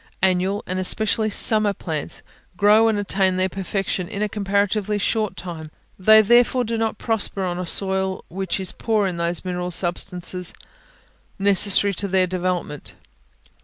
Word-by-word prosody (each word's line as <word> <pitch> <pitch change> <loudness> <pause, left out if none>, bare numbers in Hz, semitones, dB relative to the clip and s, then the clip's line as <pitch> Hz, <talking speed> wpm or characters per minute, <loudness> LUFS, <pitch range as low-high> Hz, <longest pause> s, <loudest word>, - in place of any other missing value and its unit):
Annual, 190 +2 +1
and 185 +1 -3
especially 215 +3 0
summer 215 0 +3
plants, 160 -5 -5 0.3
grow 210 +3 +5
and 220 -2 +1
attain 195 -2 0
their 185 0 +2
perfection 190 -1 -3
in 200 +3 -4
a - - +1
comparatively 205 +1 -1
short 215 +1 -1
time; 165 -3 -7 0.3
they 215 +3 +6
therefore 240 +3 +3
do 230 0 -3
not 225 -1 -2
prosper 220 -3 0
on 180 -1 -3
a 180 - -4
soil 190 0 -1
which 190 +1 -3
is 190 -2 -2
poor 220 -3 0
in 180 -3 -3
those 170 +1 -1
mineral 180 -1 -3
substances 180 0 -1 0.8
necessary 200 0 +4
to 200 +2 -2
their 190 -1 +2
development. 180 -4 -4
195 Hz, 150 wpm, -22 LUFS, 180-210 Hz, 0.8 s, they